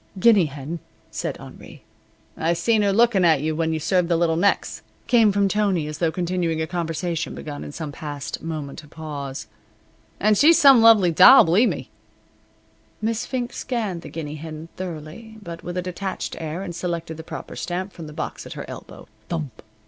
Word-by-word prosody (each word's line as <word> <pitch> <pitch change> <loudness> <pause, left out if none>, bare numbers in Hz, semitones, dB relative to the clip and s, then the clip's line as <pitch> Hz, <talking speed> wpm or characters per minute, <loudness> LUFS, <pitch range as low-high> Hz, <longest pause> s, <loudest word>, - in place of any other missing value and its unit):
"Guinea 210 -3 +6
hen," 145 +4 -6 0.3
said - - -4
Henri. - - -13 0.5
"I 165 +2 +1
seen 210 +6 +2
her 200 -1 +2
lookin' 225 -2 +4
at 160 -5 +4
you 155 +1 -1
when 160 0 0
you 160 - -1
served 180 +2 +1
the 170 - +3
little 165 -1 +2
necks," 200 +5 +1 0.2
came 225 -4 +4
from 200 0 +2
Tony, 195 -5 +1
as 150 0 -6
though 165 -2 +1
continuing 175 -2 -1
a 160 - 0
conversation 165 -1 -3
begun 145 -1 -7
in - - -7
some 155 0 -6
past 145 -1 -6
moment 155 -2 -6
of 150 - -16
pause, 140 -6 -6 0.7
"and 210 0 +3
she's 320 +3 +7
some 270 -4 +7
lovely 220 -6 +6
doll, 185 +11 +9
believe 200 +9 +3
me." 130 - -6 1.1
Miss 225 +1 -2
Fink 245 -2 -3
scanned 215 -9 -3
the - - -9
guinea 155 -2 -6
hen 160 +1 -8
thoroughly, 185 +5 -8
but 170 -5 -9
with 175 +1 -5
a 180 - -1
detached 185 +1 -4
air, 165 +3 -4
and 175 -3 -6
selected 170 -2 -4
the 160 - -9
proper - - -8
stamp 185 +2 -4
from 165 -2 -9
the - - -9
box - - -5
at - - -7
her - - -7
elbow. - - -10 0.2
Thump! 155 -9 -4
170 Hz, 185 wpm, -23 LUFS, 155-200 Hz, 1.1 s, doll